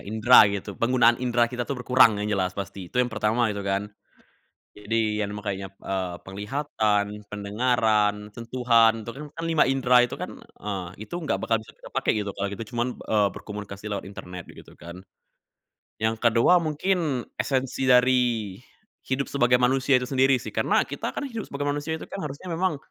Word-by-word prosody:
indra 110 +4 +6
gitu, 100 -1 -5
penggunaan 120 -1 +4
indra 120 -1 +2
kita 125 0 -3
tuh 140 - -4
berkurang 125 -5 +5
yang 105 - -2
jelas 95 -1 0
pasti, 100 -2 -7
itu - - -6
yang 125 - +1
pertama 110 +1 +1
gitu 100 -2 -4
kan. 100 +1 -1 0.9
Jadi 105 0 -1
kan 100 -1 -1
makanya, 100 -2 -4 0.2
eee, 95 -2 -3
penglihatan, 105 0 -1 0.2
pendengaran, 105 0 +1 0.2
sentuhan, 115 -2 +2
itu - - -6
kan 140 - -8
kan 165 - -6
5 165 -2 +3
indra 125 -2 +4
itu - - -6
kan, - - -6
eee, 95 -4 -6 0.2
itu 175 - -6
nggak 155 -4 -1
bakal 115 -1 +1
bisa 110 - -15
kita - - -13
pakai - - +1
gitu 105 -1 -2
kalau 100 +1 -3
gitu 100 +3 -6
cuman, 120 +1 0 0.2
eee, 105 -2 +2
berkomunikasi 105 -1 -8
lewat 100 - -3
internet 90 -3 -8
begitu - - -14
kan. 85 +3 -10 1.0
Yang 110 +1 +1
ke-2 115 +10 +5
mungkin 155 -4 -1
esensi 135 -1 -1
dari 125 -5 +3 0.5
hidup 135 +1 -1
sebagai 125 -3 +3
manusia 130 +1 +3
itu - - -3
sendiri 135 0 +3
sih, - - -8
karena - - +2
kita - - -4
kan 285 - -2
hidup 230 -4 -5
sebagai 140 +1 -4
manusia 145 +3 -2
itu - - -8
kan 195 - -6
harusnya 145 +6 -7
memang, 170 0 0
115 Hz, 175 wpm, -25 LUFS, 105-130 Hz, 1.0 s, indra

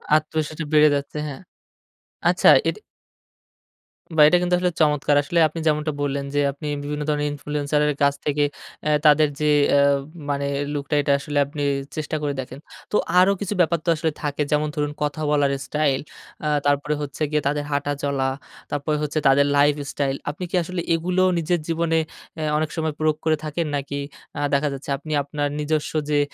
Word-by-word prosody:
আত্মবিশ্বাস 155 0 -1
বেড়ে 150 0 +7
যাচ্ছে 140 +1 -4
হ্যা। 135 -2 -6 0.9
আচ্ছা - - +5 0.2
এটা - - -5 1.4
বাহ! 150 - +8
এটা 180 - +5
কিন্তু 180 0 +2
আসলে 180 0 +1
চমৎকার। 150 -1 +3
আসলে 170 +4 0
আপনি 160 +2 -7
যেমনটা 150 0 +1
বললেন 140 -1 -1
যে 145 - +3
আপনি 145 +2 -8 0.2
বিভিন্ন 150 +1 -3
ধরনের 150 0 0
ইনফ্লুয়েন্সার 150 0 -1
এর 150 - +1
কাছ 140 - +4
থেকে 145 0 +1 0.4
অ্যা 150 - +1
তাদের 150 0 +6
যে 150 - 0 0.3
আ - - +5 0.5
মানে 140 0 -1 0.3
লুকটা 145 +1 -2
এটা 140 - 0
আসলে 145 +1 -4
আপনি 145 +1 -5 0.3
চেষ্টা 155 0 -3
করে 145 -1 -1
দেখেন। 130 +1 -6 0.3
তো - - -1 0.2
আরো 185 +2 +5
কিছু 205 0 -2
ব্যাপার 170 0 +2
তো 170 - +1
আসলে 160 0 -1
থাকে 145 -1 -2
যেমন 150 0 +2
ধরুন 145 -1 -1
কথা 150 +1 -2
বলার 145 -2 +3 0.2
স্টাইল, 150 -3 +1 0.5
আ - - +1 0.2
তারপরে 145 +1 +1
হচ্ছে 145 +1 -7
গিয়ে 150 - +2
তাদের 145 +1 0
হাঁটা 145 0 0
চলা, 140 -2 0 0.5
তারপরে 145 +1 -1
হচ্ছে 150 +1 -1
তাদের 140 +1 +5
লাইফ 145 +1 +5 0.2
স্টাইল, 135 -1 -1
আপনি 155 +5 -6
কি - - -1
আসলে 180 +1 -4
এগুলো 180 +3 0 0.2
নিজের 170 +1 0
জীবনে 165 0 +1 0.4
আ - - -3 0.2
অনেক 155 0 0
সময় 160 -2 -1
প্রয়োগ 155 -1 +1
করে 155 -1 +3
থাকেন? 155 +2 -2
নাকি 140 0 -4 0.4
আ - - -2
দেখা 140 +2 +2
যাচ্ছে 140 +1 -8
আপনি 155 +2 -9
আপনার 145 +1 -2
নিজস্ব 150 0 -1 0.2
যে 145 - +3
150 Hz, 180 wpm, -23 LUFS, 145-155 Hz, 1.4 s, বাহ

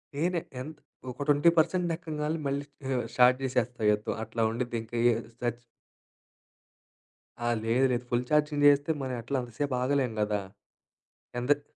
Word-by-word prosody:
నేనే 170 +3 +1 0.2
ఎంత్ 150 +3 -7 0.3
ఒక 145 - -5
20% 165 +4 +3
ఎక్కంగాల్నే 155 -1 -3
మళ్ళీ 140 +1 -2 0.3
ఆహ్, 125 -2 0
స్టార్ట్ 125 0 +6
చేసేస్తా 125 -2 -1
యుద్ధం 105 0 -1
అట్లా 115 - -3
ఉండిద్ది 120 0 -2
ఇంకా 115 +1 -6
ఎ - - +3 0.3
సచ్ 120 -1 -2 1.9
ఆహ్, 120 -1 +1
లేదు 125 +4 +3
లేదు 120 0 -1
ఫుల్ 120 +1 +2
ఛార్జింగ్ 150 -1 +2
చేస్తే 145 +2 +4
మన 130 -1 -3
ఎట్లా 135 +4 -2
అంత 120 -1 -9
సేపు 145 -3 0
ఆగలేము 130 -3 +1
కదా! 105 -1 +1 1.0
ఎందెక్ 145 +4 +2
130 Hz, 145 wpm, -29 LUFS, 120-150 Hz, 1.9 s, స్టార్ట్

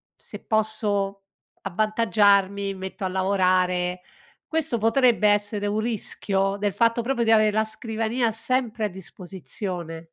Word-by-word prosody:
se - - -10
posso 205 -2 -1 0.4
avvantaggiarmi 200 -1 +2
mi - - -11
metto 190 +1 -6
a 185 - -1
lavorare" 185 -1 +1 0.5
questo 320 -6 0
potrebbe 225 -1 +3
essere 205 0 0
un 210 +1 -1
rischio, 200 -3 -1
del 205 -2 -1
fatto 230 +2 +2
proprio 240 -1 0
di 225 - +3
avere 215 -1 +5
la 220 +1 +1
scrivania 225 +2 -2
sempre 235 -1 -1
a - - +1
disposizione? 180 -2 -7
205 Hz, 130 wpm, -24 LUFS, 190-225 Hz, 0.5 s, avere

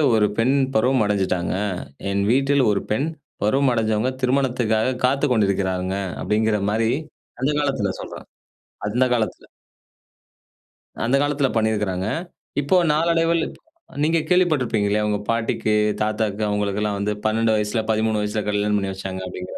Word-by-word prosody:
ஒரு 105 - +4
பெண் 130 +5 +3 0.2
பருவம் 125 +1 +3
அடைஞ்சுட்டாங்க, 95 -4 0 0.6
என் 100 0 0
வீட்டில் 135 +1 +3
ஒரு 100 - 0
பெண் 135 +8 +1 0.4
பருவம் 130 +5 +3
அடைஞ்சவங்க, 110 +1 +1
திருமணத்துக்காக 125 -2 +1
காத்துக் 135 +1 +2
கொண்டிருக்கிறாங்க. 95 -3 0 0.3
அப்பிடிங்கிறமாரி 110 +1 +1 0.5
அந்த 135 - +2
காலத்தில 135 -10 0
சொல்றேன். - - -9 0.6
அந்த 125 +5 +2
காலத்தில, 115 -3 -2 1.6
அந்த 125 +4 +2
காலத்தில 145 -1 +1
பண்ணியிருக்கிறாங்க. 105 -4 0 0.5
இப்போ 145 +7 +1 0.2
நாளடைவில 165 +1 +2 0.6
நீங்க 165 +2 +3
கேள்விப்பட்டிருப்பீங்க 145 - +2
இல்லயா! 105 +1 +1
உங்க 105 - +1
பாட்டிக்கு, 115 -1 0 0.3
தாத்தாக்கு 110 -1 -1
அவுங்களுக்கெல்லாம் 105 0 -1
வந்து 100 +1 -1
12 110 +1 +2
வயசில, 105 +1 0
13 110 0 +1
வயசில 105 +1 -1
கல்யாணம் 105 0 +1
பண்ணி 100 -1 -2
வச்சாங்க 95 0 -6
அப்பிடிங்கிற 90 0 -7
110 Hz, 125 wpm, -22 LUFS, 105-130 Hz, 1.6 s, ஒரு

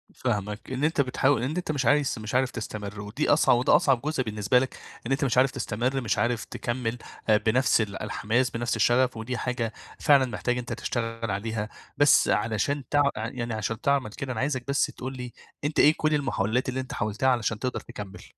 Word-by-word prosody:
فاهمك، 105 -1 -3
إن 130 +2 -2
أنت 155 -1 +3
بتحاول 135 -1 +1
إن 140 +5 -2
أنت 175 -3 -2
مش 140 -4 -1
عايز 145 +3 +3
مش 110 +3 -5
عارف 130 0 +2
تستمر، 105 -2 -6
ودي 105 +9 -2
أصع 145 +2 +5
وده 120 +1 +4
أصعب 130 -3 +3
جزء 150 -2 -1
بالنسبة 105 +2 +2
لك، 130 0 -3 0.3
إن - - -4
أنت 135 +1 +1
مش 125 -2 0
عارف 130 +1 +5
تستمر 130 +1 -1
مش 115 - 0
عارف 120 -1 0
تكمّل 120 -1 -3 0.3
آآ 105 - +6
بنفْس 120 +3 +3
ال 100 -3 -4
الحماس 120 +4 0
بنفْس 120 0 -2
الشغف، 125 0 +3
ودي 120 +3 -4
حاجة 120 -3 -2 0.3
فعلًا 140 -2 +5
محتاجة 125 +1 -2
أنت 125 - -5
تشتغل 115 -2 -3
عليها، 105 +1 -3 0.3
بس 145 0 +5
علشان 110 +7 0
تع 145 0 +4
يعني 120 +1 -4
عشان 110 0 -3
تعمل 140 -5 +1
كده 130 +4 -5
أنا 115 - -3
عايزك 130 -1 -1
بس 140 0 +2
تقول 130 +1 -7
لي، 125 -2 -7 0.3
أنت 145 +1 -1
إيه 150 - +7
كلّ 155 0 +1
المحاولات 130 -4 0
اللي 130 +1 -2
أنت 130 - -5
حاولتها 110 +5 0
علشان 115 -3 0
تقدر 125 +2 -2
تكمّل؟ 100 -6 -9
125 Hz, 200 wpm, -26 LUFS, 110-135 Hz, 0.3 s, إيه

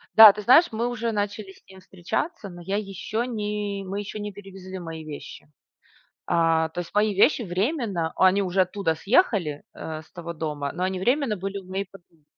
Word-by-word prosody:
Да, 220 -2 +11
ты 210 - -6
знаешь, 260 - +7
мы 230 +2 -1
уже 235 -1 -2
начали 205 -1 -3
с - - -22
ним 190 -1 -14
встречаться, 195 - -4
но 175 -1 -11
я 195 +4 -2
еще 210 +3 -3
не 210 -3 -3
мы 195 +2 -4
еще 205 +1 -6
не 205 0 -4
перевезли 190 -1 -9
мои 165 -2 -7
вещи. 150 -1 -10 0.7
А, 165 -1 +2
то 160 - -6
есть 170 - -11
мои 210 0 +2
вещи 205 +7 +4
временно- 195 - -1
они 190 +2 +4
уже 190 0 +1
оттуда 185 -2 0
съехали, 195 - +1
э, 155 -1 -6
с 160 - -22
того 170 -1 -6
дома- 150 -3 -3
но 180 - -3
они 185 0 -1
временно 245 +3 +1
были 195 +2 -4
у 195 - -8
моей 195 +1 -2
подруги. 175 -4 -19
195 Hz, 195 wpm, -25 LUFS, 175-210 Hz, 0.7 s, Да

